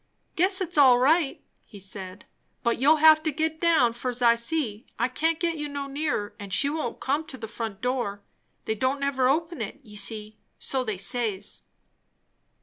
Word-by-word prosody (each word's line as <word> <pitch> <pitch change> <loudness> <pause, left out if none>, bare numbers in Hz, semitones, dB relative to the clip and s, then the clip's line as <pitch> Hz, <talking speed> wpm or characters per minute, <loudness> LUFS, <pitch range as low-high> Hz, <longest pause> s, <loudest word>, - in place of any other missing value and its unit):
"Guess 375 +3 +2
it's 345 -4 0
all 260 -3 +7
right," 290 +3 +2 0.2
he 205 - -14
said. 190 0 -6 0.4
"But 235 -1 +1
you'll 290 +5 +5
have 310 0 +6
to 310 0 -1
git 315 +2 -2
down, 315 -9 +4
fur's 245 +1 -4
I 235 -1 +6
see; 235 -2 -2
I 235 - +1
can't 320 +5 -1
git 335 -2 -1
you 295 -1 -4
no 285 -1 -4
nearer, 275 -7 -2
and 200 -1 -8
she 280 +8 +2
won't 300 -6 -4
come 285 +4 -1
to 265 - -6
the 225 - -7
front 220 -2 -6
door. 240 -6 -2 0.4
They 220 - 0
don't 260 +5 -1
never 265 -2 +1
open 330 0 -1
it, 220 +6 -6
ye 210 -3 -14
see. 215 +1 -1 0.2
So 265 -1 -1
they 215 -5 -3
says." 215 -1 -1
255 Hz, 185 wpm, -26 LUFS, 220-310 Hz, 0.4 s, all